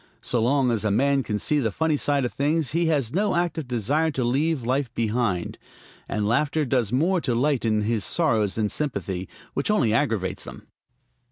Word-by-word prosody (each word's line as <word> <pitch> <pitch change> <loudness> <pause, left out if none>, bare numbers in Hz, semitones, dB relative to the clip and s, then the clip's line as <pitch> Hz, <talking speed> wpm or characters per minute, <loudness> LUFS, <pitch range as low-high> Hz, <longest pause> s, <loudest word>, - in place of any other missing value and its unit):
So 120 - 0
long 130 +1 +2
as 115 -3 0
a 110 - +1
man 140 +6 +2
can 105 -5 -2
see 150 +7 +1
the 115 -5 +1
funny 160 +6 +1
side 140 -2 +1
of 120 - -4
things 150 +1 0
he 170 +2 +1
has 140 -7 0
no 200 +2 +1
active 170 -4 -1
desire 130 +7 +1
to 135 -4 -2
leave 135 +2 0
life 130 +1 0
behind; 110 -6 -1 0.5
and 105 -1 -1
laughter 150 +6 +1
does 120 -5 0
more 170 +8 +2
to 125 -6 0
lighten 120 -5 +1
his 110 0 0
sorrows 110 - +1
than 110 -1 +1
sympathy, 95 - -3 0.2
which 140 - -1
only 125 - +2
aggravates 110 -4 0
them. - - -10
130 Hz, 185 wpm, -24 LUFS, 110-150 Hz, 0.5 s, long